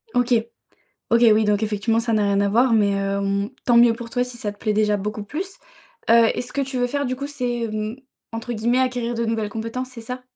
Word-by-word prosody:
OK. 245 0 +2 0.8
OK, 235 0 +4
oui, 215 0 +3
donc 210 +1 +1
effectivement, 215 +2 0
ça 230 0 -2
n'a 215 -1 +2
rien 200 0 +2
à 200 - +2
voir 240 +3 +3
mais, 210 -2 +4
hem, 200 +1 -1 0.2
tant 240 -1 +5
mieux 235 -1 +6
pour 230 0 -8
toi 245 +1 0
si 250 -1 -8
ça 210 -3 -3
te 205 - -16
plaît 215 0 -1
déjà 210 0 +2
beaucoup 210 +1 -4
plus. 365 - -5 0.6
Heu 230 -1 +6
et - - 0
ce 245 - -9
que 280 - -1
tu 265 -1 -3
veux 245 0 +1
faire, 285 +2 -2
du 255 +1 -2
coup, 280 +2 -5
c'est 245 -5 -2
mmh, 215 +1 -3 0.4
entre 230 +2 -5
guillemets, 235 +3 +1
acquérir 250 -2 0
de 235 - -1
nouvelles 225 -2 -1
compétences, 230 +4 -4
c'est 245 -2 -10
ça? 250 +3 -6
230 Hz, 245 wpm, -22 LUFS, 210-245 Hz, 0.8 s, mieux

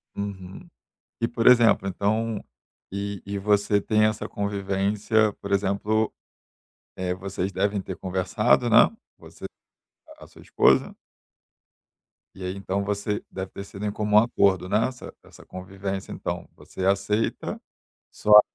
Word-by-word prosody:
Uhum. 95 -2 -7 0.5
E, 115 - +2
por 115 -1 -2
exemplo, 120 -5 +6
então, 110 +3 -1 0.5
e 100 -1 -4
e 100 0 -4
você 100 0 +2
tem 110 +1 +2
essa 110 0 -1
convivência, 100 +2 0
por 100 - -5
exemplo, 100 +2 +1 0.9
eh, 90 -1 -1
vocês 95 0 -4
devem 100 +2 0
ter - - -6
conversado, 95 -1 +1
né, - - +7 0.3
você - - -12 0.7
a - - -12
sua - - -17
esposa. - - +3 1.4
E 95 - -9
aí, 90 +1 -3
então, 100 0 -2
você 105 +1 -2
deve 95 0 -6
ter 100 - -7
sido 100 +1 -8
em 105 - -1
comum 105 0 +1
acordo, 100 -5 +3
né, 105 +5 +2
essa 125 -1 -9
essa - - -16
convivência, 95 +1 -6
então - - -5
você 95 - -8
aceita, 100 +3 0 0.5
só 105 0 +7
100 Hz, 135 wpm, -25 LUFS, 95-105 Hz, 1.4 s, né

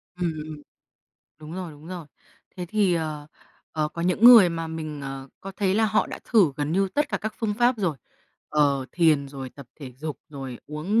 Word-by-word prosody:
Ừm, 175 -2 -1
ừm. 155 -1 -8 0.8
Đúng 155 0 -10
rồi, 180 -3 -5
đúng 150 +1 -14
rồi. 175 -3 -7 0.5
Thế 180 -1 -4
thì, 200 -1 +2
ờ, 155 -3 -3 0.5
ờ, 155 -1 0
có 170 - -5
những 180 +5 +1
người 235 -7 +10
mà 165 -1 -3
mình, 155 -2 -5
ờ, 135 -1 -6
có 195 - -7
thấy 195 -2 +1
là 220 +2 +3
họ 215 0 +2
đã - - -7
thử 200 - +4
gần 150 +1 -1
như 195 +2 +2
tất 295 0 +1
cả - - -1
các 220 0 -4
phương 215 -3 -1
pháp 240 +3 +3
rồi, 170 -8 0 0.5
ờ, 140 -3 +2
thiền, 155 -5 +3
rồi 135 -2 -7
tập 140 -1 -12
thể 130 -3 -8
dục, 145 +2 -6
rồi 135 -4 -7
uống, 160 +9 0
160 Hz, 205 wpm, -25 LUFS, 145-195 Hz, 0.8 s, người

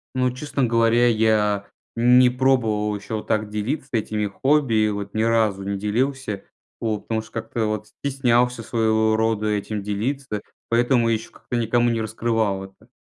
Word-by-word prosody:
Ну, 125 -1 +2
честно 140 +1 -3
говоря, 115 +1 +3
я 110 -3 +2 0.3
не 125 +1 +6
пробовал 115 -5 +1
еще 105 +2 -5
вот 105 - -5
так 110 -1 0
делиться 130 +7 -3
этими 105 -2 -1
хобби, 135 +3 +1
и - - +1
вот 100 -1 -5
ни 110 +1 +1
разу 110 -4 +1
не 100 0 -2
делился, 110 0 -2 0.3
вот, 110 -3 -1
потому 110 -1 -2
что 110 - -16
как-то 115 0 -2
вот 105 0 -3
стеснялся 125 -3 +1
своего 110 -1 +1
рода 110 -1 0
этим 105 0 -2
делиться, 105 +2 -3 0.3
поэтому 120 0 +3
еще 110 0 -2
как-то 120 - -5
никому 120 +1 +2
не 115 -1 0
раскрывал 110 -3 -1
это. 95 +4 -15
110 Hz, 160 wpm, -23 LUFS, 105-120 Hz, 0.3 s, не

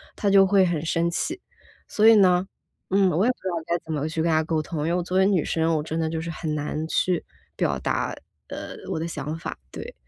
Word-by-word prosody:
他 205 - 0
就 195 -1 +7
会 190 0 +4
很 170 -4 -1
生 165 +1 +1
气。 325 - -2 0.5
所 215 +1 +3
以 225 - +9
呢， 185 -3 +4 0.4
嗯， 195 0 +4
我 175 +6 +2
也 250 - +4
不 250 - -9
知 - - -7
道 175 - -2
该 170 0 +1
怎 160 - -4
么 150 0 -1
去 160 0 -2
跟 170 - +1
他 155 0 +3
沟 160 0 0
通， 155 +1 -5
因 150 - -1
为 - - +1
我 - - 0
作 180 +2 -1
为 190 - +5
女 190 -5 +2
生， 165 0 +1
我 150 - -1
真 160 +1 -3
的 160 -1 0
就 160 0 -3
是 165 - -5
很 160 -1 -3
难 150 +1 -3
去 180 +1 0 0.3
表 - - 0
达， - - -1 0.4
呃， - - -7 0.2
我 - - -1
的 165 - -2
想 150 -1 -4
法， 165 - -6
对。 - - -8
170 Hz, 275 characters per minute, -24 LUFS, 160-190 Hz, 0.5 s, 以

